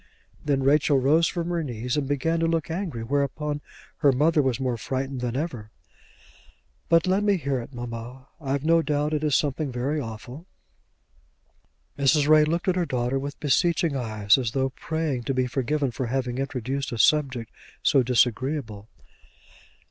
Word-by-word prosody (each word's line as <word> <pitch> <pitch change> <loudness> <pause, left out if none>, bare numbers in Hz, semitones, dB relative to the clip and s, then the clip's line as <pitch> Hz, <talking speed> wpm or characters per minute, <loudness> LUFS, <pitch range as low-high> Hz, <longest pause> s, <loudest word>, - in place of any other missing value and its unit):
Then 140 -2 0
Rachel 145 +1 +4
rose 150 +6 +3
from 170 -2 -3
her 170 -2 -1
knees 120 -2 -3
and 145 -2 -1
began 155 +4 0
to 165 - +1
look 165 -1 -1
angry, 165 - -3
whereupon 145 +3 -1 0.4
her 140 - +4
mother 150 +4 +3
was 130 -2 0
more 130 -2 -1
frightened 130 +3 -3
than 125 -1 -2
ever. 125 -9 -4 1.2
"But 165 0 +4
let 190 +2 +2
me 205 -2 +3
hear 140 -5 -1
it, 120 - -8
mamma. 120 +1 -7
I've 140 0 -2
no 165 +1 +4
doubt 150 -1 -1
it 150 0 -1
is 150 -3 +2
something 145 -1 0
very 135 +5 -1
awful." 125 - -8 1.5
Mrs. 140 +1 +3
Ray 155 0 +6
looked 170 +4 -1
at 185 -1 +2
her 180 - +2
daughter 125 +1 -1
with 140 +1 -6
beseeching 165 +1 +2
eyes, 110 -4 +2
as 120 -3 -2
though 135 -1 +1
praying 150 -2 -2
to 135 - -1
be 130 0 +2
forgiven 135 +2 -1
for 120 +2 -3
having 125 0 -2
introduced 135 0 -3
a 120 - -4
subject 130 -3 +2 0.3
so 135 - +4
disagreeable. 125 -2 0
140 Hz, 165 wpm, -25 LUFS, 125-155 Hz, 1.5 s, Ray